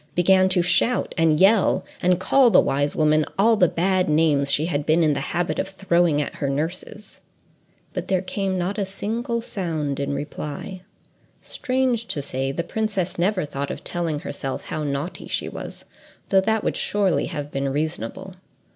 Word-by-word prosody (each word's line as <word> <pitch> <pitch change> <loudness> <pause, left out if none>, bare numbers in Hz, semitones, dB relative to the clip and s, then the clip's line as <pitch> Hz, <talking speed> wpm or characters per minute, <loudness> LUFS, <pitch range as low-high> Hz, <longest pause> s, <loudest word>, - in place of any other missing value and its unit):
began 185 +1 +4
to 180 -2 +3
shout 180 +8 +1
and 160 -3 +3
yell, 200 +1 +4 0.2
and 180 0 +3
call 255 +6 +4
the 205 - +6
wise 145 +1 +1
woman 155 0 +3
all 225 +3 +5
the 185 -4 +4
bad 185 +2 +1
names 150 -3 +3
she 150 +2 +2
had 150 -4 -1
been 160 +3 +3
in 155 -2 +3
the 140 - -1
habit 170 +5 -2
of - - -1
throwing 175 -5 +1
at 145 - -3
her 140 - -1
nurses. 165 +8 -5 0.7
But - - -4
there 190 -1 +1
came 190 0 -2
not 185 +4 -2
a - - +1
single 230 +4 -3
sound 160 - -3
in 140 0 -2
reply. 150 +5 -6 0.6
Strange 255 -4 -1
to 145 - -2
say, 135 0 -2
the 170 - -3
princess 190 -3 -2
never 185 -1 +1
thought 140 -1 -4
of - - -6
telling 165 -4 -2
herself 135 -2 -5
now - - -2
how 155 - -2
naughty 145 +5 -4
she - - -2
was, - - -8 0.4
though 190 -1 +5
that 220 +2 0
would - - -1
surely 200 -3 +1
have 145 -2 -5
been 135 0 -1
reasonable. 150 -4 -3
175 Hz, 180 wpm, -23 LUFS, 150-195 Hz, 0.7 s, the